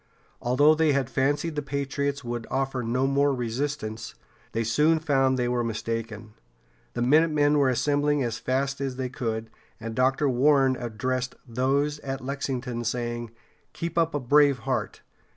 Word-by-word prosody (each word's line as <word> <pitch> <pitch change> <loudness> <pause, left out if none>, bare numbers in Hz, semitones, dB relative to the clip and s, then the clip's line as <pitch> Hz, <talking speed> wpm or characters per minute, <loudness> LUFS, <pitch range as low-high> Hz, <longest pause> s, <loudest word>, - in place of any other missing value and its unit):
Although 145 +6 +4
they 155 -1 +2
had 135 -3 -1
fancied 145 +4 0
the 150 - -1
patriots 140 0 -2
would 120 -1 -4
offer 135 -1 -1
no 125 +3 0
more 140 0 +2
resistance, 120 -2 -3 0.4
they 115 - -1
soon 150 +8 +3
found 135 -4 +2
they 125 -1 0
were 120 0 0
mistaken. 115 -1 -4 0.6
The 120 - 0
minutemen 150 +1 +4
were 135 -2 +4
assembling 145 +3 +1
as 115 -1 -3
fast 135 +1 -1
as 135 -2 -2
they 130 -1 -3
could, 115 -3 -4 0.3
and 115 0 -5
Dr. 130 +4 +2
Warren 135 +1 +3
addressed 125 +2 -3
those 140 +5 0
at 135 -1 -4
Lexington, 130 -3 -3
saying: 120 0 -3 0.4
"Keep 170 0 -4
up 165 -2 +1
a - - +1
brave 145 +1 +4
heart. - - -2
130 Hz, 150 wpm, -26 LUFS, 120-145 Hz, 0.6 s, Although